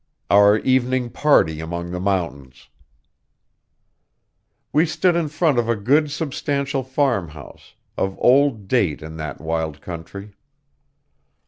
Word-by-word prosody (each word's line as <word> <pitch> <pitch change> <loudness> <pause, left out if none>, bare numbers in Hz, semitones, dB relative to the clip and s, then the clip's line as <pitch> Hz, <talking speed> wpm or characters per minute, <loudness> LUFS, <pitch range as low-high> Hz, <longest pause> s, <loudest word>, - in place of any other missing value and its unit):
OUR 100 +1 +6
EVENING 130 -1 +1
PARTY 120 - +2
AMONG 85 +2 -5
THE 90 - -4
MOUNTAINS 80 -9 -3 2.0
We 155 +4 +3
stood 175 +2 +1
in 170 -2 0
front 155 -3 +1
of 115 -1 -1
a 115 - +2
good 140 +9 +2
substantial 140 -2 -2
farmhouse, 120 - -3 0.2
of 95 0 -2
old 130 -6 +3
date 95 - 0
in 80 +1 -9
that 75 -2 -6
wild 80 -1 -3
country. 95 +5 -9
105 Hz, 115 wpm, -21 LUFS, 85-140 Hz, 2.0 s, OUR